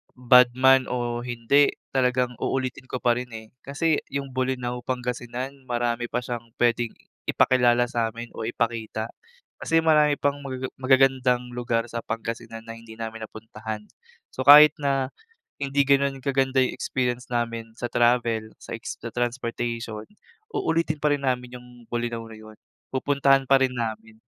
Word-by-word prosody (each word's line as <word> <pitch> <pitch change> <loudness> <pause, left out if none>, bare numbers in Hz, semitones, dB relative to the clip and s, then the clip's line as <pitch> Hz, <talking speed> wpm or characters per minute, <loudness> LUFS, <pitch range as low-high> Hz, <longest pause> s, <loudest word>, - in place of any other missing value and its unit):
bad 125 0 +6
man 130 0 +5
o 120 -1 -2
hindi, 120 +4 +2 0.2
talagang 125 -1 +1
uulitin 130 -1 -2
ko - - -5
pa 120 - +4
rin, 125 - -6
eh. 110 0 -9
Kasi 150 +3 0
'yung 140 -1 -4
Bolinao, 125 -1 -2
Pangasingan 125 +1 -4
marami 120 0 -1
pa 125 +1 -2
siyang 120 -1 -5
puwedeng 120 -1 +1 0.3
ipakilala 120 -1 +3
sa'min 115 0 -3
o 110 - -5
ipakita. 115 -1 -2 0.5
Kasi 165 0 +2
marami 150 -2 +4
pang 145 0 0
magaga 130 -2 -5
magagandang 130 -2 +3
lugar 120 -1 -2
sa 115 - -3
Pangasinan 115 0 -5
na 115 0 -9
hindi 115 -1 -12
namin 110 -1 -6
napuntahan. 110 -1 -7 0.5
So 130 +1 -5
kahit 150 +1 +9
na 135 -2 0 0.5
hindi 140 0 +1
gano'n 140 -1 +2
kaganda 135 -1 +2
'yung - - 0
experience 125 -2 -2
namin 115 -2 -3
sa 120 0 -5
travel, 120 -2 +1
sa - - -5
ex - - -6
sa 115 0 -6
transportation, 115 -2 -3 0.5
uulitin 165 - 0
pa 150 - +3
rin 145 - +1
namin 125 -1 -2
'yung 125 - -16 0.2
Bolinao 120 -1 -2
na 110 - -10
'yon, 110 0 -13 0.4
pupuntahan 135 0 +3
pa 135 -1 +6
rin 130 -1 +1
namin. 110 -1 -5
125 Hz, 150 wpm, -25 LUFS, 115-135 Hz, 0.5 s, kahit